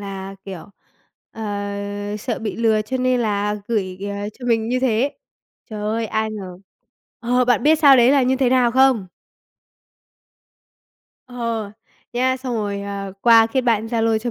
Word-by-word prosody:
là, 195 -1 -7
kiểu, 190 -4 -8 0.7
ờ, 225 - -8 0.8
sợ 230 +1 -3
bị 220 -2 -4
lừa 220 -2 +2
cho 255 +5 -3
nên 255 -1 +1
là 210 -2 0
gửi, 190 -5 -2
ờ, 200 +1 -4
cho 255 - -9
mình 225 -2 +1
như 255 +1 0
thế. 260 +2 +1 0.6
Trời 215 -1 -6
ơi, 220 +2 -1
ai 220 0 -1
ngờ. 190 -4 -8 0.6
Ờ, 250 +1 +1
bạn 245 -3 +2
biết 310 +2 +4
sau 285 -3 +7
đấy 245 +1 +5
là 275 -1 +4
như 260 +1 +2
thế 260 -2 +2
nào 250 -2 +3
không? 260 -5 +3 2.2
Ờ. 230 -4 -4 0.4
Nha, 260 +2 +1
xong 255 -1 -5
rồi, 205 -2 -2
ờ, 200 -1 -5
qua 230 -1 +6
kết 260 +3 0
bạn 225 -3 +1
Zalo 225 -1 +1
cho 240 +2 -4
225 Hz, 165 wpm, -21 LUFS, 210-250 Hz, 2.2 s, sau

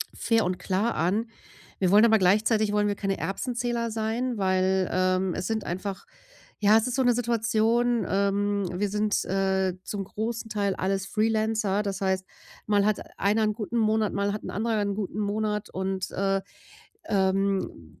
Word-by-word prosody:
fair 225 -3 +1
und 180 0 -1
klar 200 +5 0
an. 195 +8 0 0.5
Wir 185 -1 +2
wollen 210 +3 +7
aber 220 -1 +5
gleichzeitig 210 +3 +3
wollen 210 0 +2
wir 205 - 0
keine 195 -1 -2
Erbsenzähler 235 +2 -2
sein, 225 +2 -2
weil, 185 -1 +1
ähm, 185 0 +1
es 180 - -3
sind 220 -1 -1
einfach 190 +2 -4 0.6
ja, 210 +1 +6
es 225 - +1
ist 245 - -2
so 265 - +2
'ne 245 -1 +4
Situation, 235 0 +1
ähm, 200 0 +1
wir 200 +3 -1
sind, 210 +1 0
äh, 190 -1 0
zum 200 0 -4
großen 225 +2 -4
Teil 200 -2 0
alles 195 +1 -1
Freelancer, 215 -2 +1
das 200 -1 -4
heißt, 190 -1 0 0.4
mal 205 -1 +3
hat 215 -1 +1 0.2
einer 210 +3 +2
'n 215 0 +1
guten 220 +2 -4
Monat, 220 -1 +2
mal 200 0 0
hat 210 - -5
'n - - -6
anderer 220 +1 0
'n 200 0 -1
guten 210 0 -4
Monat 210 0 -1
und, 190 0 -3
äh, 195 0 0 0.7
ähm, 190 - -1
205 Hz, 170 wpm, -26 LUFS, 195-220 Hz, 0.7 s, wollen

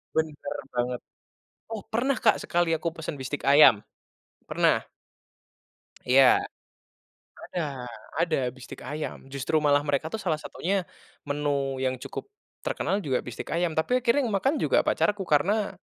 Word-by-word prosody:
Benar 155 -2 -2 0.2
banget. 125 0 -1 0.7
Oh 225 -2 -4
pernah 255 +4 0
Kak, 220 - +4
sekali 175 -1 +1
aku 165 +1 0
pesan 155 -3 -6
bistik 130 +2 -4
ayam, 140 -6 +7 0.7
pernah. - - +3 1.2
Iya, 130 +1 +6 1.1
ada, - - -1 0.6
ada 170 -2 +1 0.2
bistik 130 -2 -10
ayam 150 +1 -4 0.2
justru 140 +3 -2
malah 145 -1 +3
mereka 145 +1 0
tuh - - 0
salah 160 -4 0
satunya 190 +1 -2 0.4
menu 145 -2 -1
yang 130 0 +1
cukup - - -6 0.4
terkenal 350 - 0
juga 130 -3 +1
bistik 120 -1 -7
ayam 170 0 +1
tapi 250 +11 +2
akhirnya 245 +4 +3
yang 225 - -2
makan 270 +9 +1
juga - - +3
pacarku 205 -1 +1
karena, 195 +8 +2
155 Hz, 135 wpm, -27 LUFS, 140-200 Hz, 1.2 s, ayam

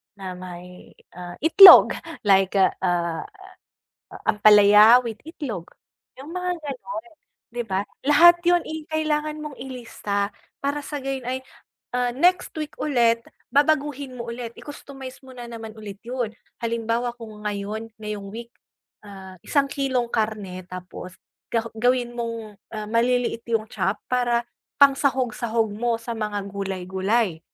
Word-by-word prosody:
na 185 -2 -7
may, 180 0 -11 0.2
ah, 175 -1 -7
itlog, 365 +4 +9 0.2
like, 195 -2 +3
ah, 190 - +5
ah, 170 -2 -1 1.1
ampalaya 210 +3 +7
with 230 -3 -6
itlog, 260 - -6 0.5
'yong 270 +4 -11
mga 360 0 -2
gano'n, 320 +4 -6 0.4
'di 240 +1 -4
ba? 195 -2 -1 0.2
Lahat 340 +4 +7
'yon, 350 0 +4
eh, 315 -1 -7
kailangan 305 -1 -1
mong 300 -3 -7
ilista. 230 -5 -4 0.3
Para 285 +1 -2
sa 290 -2 -5
gayon 265 -2 -4
ay, 260 +1 -3 0.5
ah, 245 0 +1
next 355 +8 +2
week 305 0 -5
ulit 235 -5 +2 0.3
babaguhin 285 -2 +1
mo 235 -1 -6
ulit, 235 -1 -7
i-customize 270 -3 -10
mo 260 - -12
na 245 - -8
naman 225 -1 -8
ulit 205 -2 -9
'yon. 245 -3 -2 0.3
Halimbawa 230 +1 -1
kung 215 -2 -10
ngayon 210 +2 -4
ngayong 210 -2 -6
week, 235 +1 -8 0.5
ah, 190 -2 -11
1 280 -1 +1
kilong 260 -3 -1
karne 210 -5 -2
tapos 180 0 -9 0.4
ga 230 -1 0
gawin 245 +1 +1
mong, 230 -3 -5 0.2
ah, 215 -1 -5
maliliit 235 +1 +1
'yong 225 -2 0
chop 195 - -1
para 240 -1 +1 0.3
pangsahog-sahog 255 -5 +2
mo 235 +2 0
sa 235 +1 -5
mga 210 -2 -3
gulay-gulay. 190 0 -1
235 Hz, 135 wpm, -23 LUFS, 210-270 Hz, 1.1 s, itlog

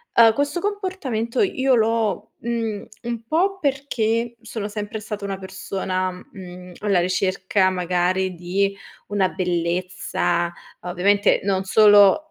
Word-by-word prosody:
uhm, 225 -1 +7
questo 285 +6 -1
comportamento 370 - -2
io 270 -9 +2
l'ho, 225 -2 0
mhmm, 225 -3 -3 0.2
un 235 -1 -4
po' 380 +7 +1
perché 240 - -1
sono 220 -2 -5
sempre 210 +1 -5
stata 210 -1 -6
una 195 -1 -3
persona, 190 -1 -3
mhmm, 180 -1 -11
alla 200 -4 +2
ricerca 185 +1 +1
magari 180 +1 0
di 195 +3 -1 0.3
una 200 -2 +1
bellezza, 175 -1 -1 0.3
ovviamente 190 +3 +2
non 195 -1 0
solo 205 +6 +6
205 Hz, 115 wpm, -22 LUFS, 185-230 Hz, 0.3 s, uhm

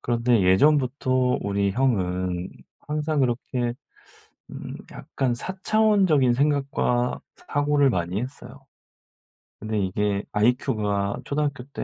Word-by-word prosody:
그런데 120 -2 +1
예전부터 130 +4 +2
우리 100 0 0
형은 95 -6 -1 0.3
항상 150 0 -2
그렇게 120 -1 -1 0.8
음 - - -8 0.2
약간 130 -3 -2
사차원적인 190 - +2
생각과 135 -3 0 0.3
사고를 145 -1 +2
많이 90 -1 -2
했어요. 135 +1 -9 0.9
근데 110 0 -3
이게 100 +1 -1
아이큐가 105 -3 0
초등학교 145 -3 -2
때 - - -5
125 Hz, 245 characters per minute, -24 LUFS, 105-140 Hz, 0.9 s, 예전부터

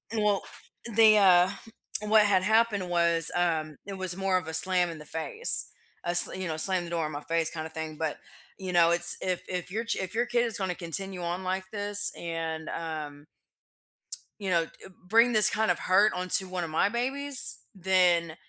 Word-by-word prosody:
Well, 210 -2 -1 0.5
they, 220 -2 +5
uh 185 -2 +4 0.6
what 215 0 +3
had 190 -2 +1
happened 215 -3 0
was, 170 -2 +1
um, 160 -4 -3
it 200 - -8
was 185 -1 -1
more 190 -1 -2
of 180 - -6
a 160 - -7
slam 180 +1 +4
in 165 - -9
the 150 - -13
face. 165 - 0 0.4
A 175 - -4
s 175 - +9
you 185 -1 -6
know, 160 -1 -5
slam 185 +2 +2
the 170 - -10
door 170 -2 -3
in 155 - -6
my 145 - -7
face 165 0 -2
kinda 160 -1 -8
thing, 160 -1 -8
but, 160 -1 -4 0.4
you 185 -2 -7
know, 170 -1 +3
it's 175 +1 +6
if 185 -1 -4
if 180 0 -6
your 225 +3 -5
ch - - -2
if 190 -1 -6
your 240 - -1
kid 240 0 -1
is 230 - -3
gonna 190 -3 -4
continue 180 +2 -2
on 175 +2 -5
like 185 +1 -4
this 205 0 +2
and, 165 -2 -6
um 155 -3 -8 1.2
you 195 - -5
know, 170 -2 0
d - - -20 0.4
bring 230 +3 +2
this 215 -1 +7
kind 220 0 -2
of - - 0
hurt 200 +3 +2
onto 185 +1 +3
one 185 -1 -5
of 165 - -7
my 160 +5 0
babies, 265 +4 +3 0.2
then, 180 -3 0
180 Hz, 200 wpm, -26 LUFS, 165-205 Hz, 1.2 s, s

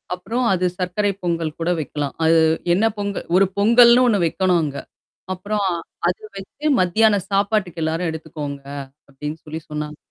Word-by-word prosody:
அப்புறம் 230 +7 -2
அது 185 0 0
சர்க்கரை 190 +3 0
பொங்கல் 165 -2 -1
கூட 165 +1 -1
வைக்கலாம். 145 -1 -3
அது 165 0 +5 0.3
என்ன 205 +5 +2
பொங்கல் 200 -1 -3
ஒரு 195 - +5
பொங்கல்ன்னு 235 +4 +6
ஒண்ணு 210 -4 +3
வைக்கணும் 180 +1 +2
அங்க. 140 -2 -4 0.6
அப்புறம் 200 +2 -2 0.4
அத 180 - +1 0.2
வச்சு 195 +10 -9
மத்தியான 205 +3 +3
சாப்பாட்டுக்கு 195 -4 0
எல்லாரும் 165 +2 -1
எடுத்துக்கோங்க. 150 -3 -6 0.5
அப்டின்னு 150 +3 -6
சொல்லி 155 +1 -5
சொன்னாங்க. 150 0 -5
180 Hz, 140 wpm, -21 LUFS, 160-205 Hz, 0.6 s, பொங்கல்ன்னு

